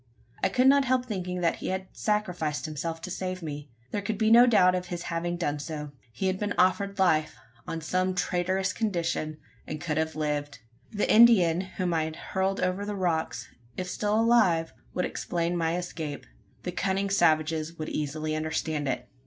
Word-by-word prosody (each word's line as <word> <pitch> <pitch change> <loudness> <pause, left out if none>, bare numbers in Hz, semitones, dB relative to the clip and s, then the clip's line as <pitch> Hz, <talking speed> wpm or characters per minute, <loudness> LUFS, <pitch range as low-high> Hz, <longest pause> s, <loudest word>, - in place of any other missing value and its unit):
I 195 - +2
could 250 +6 +2
not 275 0 +6
help 255 -1 +2
thinking 180 -5 -3
that 170 - +1
he - - -5
had 190 0 -2
sacrificed 180 -9 -1
himself 165 +1 -4
to 185 - -6
save 185 -1 -4
me. 145 -2 -6 0.2
There 205 - -1
could 205 +1 -3
be 220 0 +2
no 240 +2 +8
doubt 190 -6 +5
of 180 0 -2
his 175 -1 -5
having 175 +1 -1
done 150 -4 -1
so. 150 -1 -5 0.2
He 115 - -4
had 190 0 0
been 205 -1 -2
offered 200 +2 +2
life, 160 -5 +2 0.3
on 165 - -4
some 185 +3 0
traitorous 185 +1 0
condition, 170 -7 -1 0.3
and 155 - -4
could 150 0 -2
have 160 0 -1
lived. 150 -2 -2 0.3
The 205 - 0
Indian 195 -7 +6
whom 185 -2 -3
I 160 -1 +1
had 160 0 -5
hurled 190 +3 -1
over 185 +2 0
the 205 0 -3
rocks, 160 - -1 0.3
if 185 - -3
still 210 +3 0
alive, 190 -9 +3 0.2
would 180 - +1
explain 170 0 -2
my 165 0 0
escape. 160 -5 -5 0.4
The 180 - -3
cunning 195 +2 -1
savages 160 -2 +2
would 155 - -4
easily 155 +1 -2
understand 155 -1 -2
it. 125 -1 -2
175 Hz, 185 wpm, -28 LUFS, 155-195 Hz, 0.4 s, no